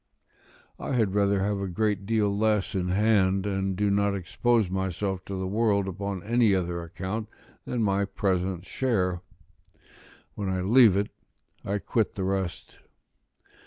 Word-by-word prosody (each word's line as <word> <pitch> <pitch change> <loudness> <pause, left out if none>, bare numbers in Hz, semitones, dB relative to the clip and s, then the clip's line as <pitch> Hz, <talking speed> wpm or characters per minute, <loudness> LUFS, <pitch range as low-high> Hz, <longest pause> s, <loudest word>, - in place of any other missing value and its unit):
I - - -3
had 110 -6 +1
rather 100 -1 +2
have 100 0 0
a 100 - -2
great 100 +1 -1
deal 105 -3 +1
less 105 -1 +1
in 90 -2 -1
hand, 95 -1 +2
and 95 -1 -1
do 100 +1 +1
not 100 0 +2
expose 110 +4 +1
myself 95 0 -2
to 100 - -5
the 95 - -2
world 100 0 +1
upon 95 -1 -4
any 115 -2 +3
other 85 -2 -2
account 95 +6 -5 0.4
than 120 -2 -1
my 100 -1 +1
present 95 -2 -1
share; 95 -10 0 1.1
when 100 -2 -3
I 95 -1 -1
leave 110 0 +6
it 100 +1 -1 0.5
I 100 +1 -1
quit 110 +1 -1
the 95 - -3
rest. 95 -2 -3
100 Hz, 150 wpm, -27 LUFS, 95-105 Hz, 1.1 s, leave